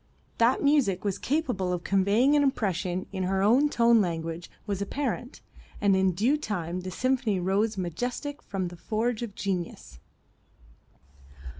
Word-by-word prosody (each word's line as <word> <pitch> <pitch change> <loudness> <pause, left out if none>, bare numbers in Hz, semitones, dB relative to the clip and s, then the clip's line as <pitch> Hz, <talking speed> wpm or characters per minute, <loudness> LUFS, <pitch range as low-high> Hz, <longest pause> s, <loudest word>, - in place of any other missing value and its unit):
That 235 +2 +3
music 275 -11 +3
was 200 -1 -1
capable 250 - -1
of 175 -1 -2
conveying 205 +9 +3
an 295 - +4
impression 190 - 0
in 190 - -3
her 190 +1 +1
own 255 +8 +4
tone 235 -3 +4
language 165 -2 -3 0.2
was 200 -2 -3
apparent, 250 +3 -3 0.4
and 200 -2 +3
in 190 -1 +2
due 235 - +2
time 180 - -3
the 185 - -6
symphony 240 -1 0
rose 200 +4 0
majestic 245 - -3
from 185 -3 -3
the 175 - -11
forge 220 +5 -1
of 220 -4 -5
genius. 175 - -4
200 Hz, 145 wpm, -27 LUFS, 185-245 Hz, 0.4 s, an